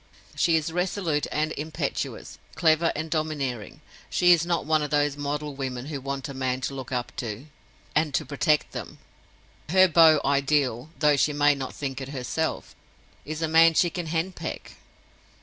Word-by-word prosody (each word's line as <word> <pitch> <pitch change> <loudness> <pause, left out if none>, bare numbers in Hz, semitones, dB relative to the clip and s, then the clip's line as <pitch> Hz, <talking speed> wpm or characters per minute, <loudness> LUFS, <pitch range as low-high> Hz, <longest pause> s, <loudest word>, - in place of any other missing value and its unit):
She 165 - +3
is 160 0 -1
resolute 180 -4 -1
and 155 +1 0
impetuous, 155 +1 -4 0.2
clever 165 0 +3
and 160 +1 -4
domineering; 145 -8 -3 0.3
she 175 0 +4
is 170 -1 +4
not 170 -3 0
one 155 0 +2
of 150 - -2
those 145 -1 +1
model 145 +1 -3
women 130 -2 -5
who 140 - -4
want 135 +2 -4
a 140 - -7
man 130 -1 -1
to 135 - -3
look 130 -2 -7
up 125 -1 -3
to, 115 +2 -5 0.5
and 155 -1 +2
to - - 0
protect 150 +1 +1
them—her 185 - -2
beau 160 -2 +6
ideal 140 -2 +1
(though 150 -2 +3
she 150 +2 +2
may 145 0 +4
not 135 -2 -6
think 135 -2 -4
it 135 - -6
herself) 140 +4 -3 0.5
is 155 +2 -4
a - - +1
man 165 +1 +5
she 175 +1 +3
can 175 -1 -4
henpeck. 165 +3 -4
150 Hz, 165 wpm, -26 LUFS, 135-160 Hz, 0.5 s, beau